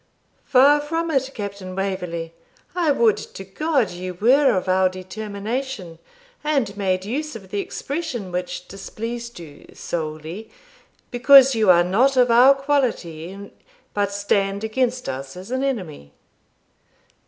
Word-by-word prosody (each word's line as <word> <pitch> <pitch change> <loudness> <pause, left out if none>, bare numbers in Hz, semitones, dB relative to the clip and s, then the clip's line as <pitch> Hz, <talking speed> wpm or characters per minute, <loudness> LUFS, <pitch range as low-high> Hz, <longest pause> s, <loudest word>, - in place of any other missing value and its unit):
'Far 285 +2 +5
from 330 +3 -2
it, 270 -2 +1
Captain 200 -3 -6
Waverley. 180 -4 -3 0.4
I 345 -3 +1
would 235 -6 +3
to 195 - -8
God 270 - 0
you 180 +1 -6
were 250 +4 +4
of 185 - -3
our 185 0 +3
determination! 200 +1 -5 0.4
and 275 -9 0
made 190 -2 -1
use 295 +7 -3
of 190 -4 -11
the 205 - -2
expression 265 - -4
which 180 0 -4
displeased 235 +3 -7
you, 155 -4 -13
solely 160 +6 -5 0.6
Because 270 +2 +7
you 220 -4 +2
are 175 -1 +7
not 245 +10 +2
of 250 -1 +4
our 255 +4 +7
quality, 200 - -2 0.4
But 200 -1 0
stand 200 0 0
against 250 +3 -1
us 135 +3 -6
as 190 +6 -9
an 260 +1 -1
enemy.' 175 - -4
205 Hz, 130 wpm, -22 LUFS, 185-260 Hz, 0.6 s, Because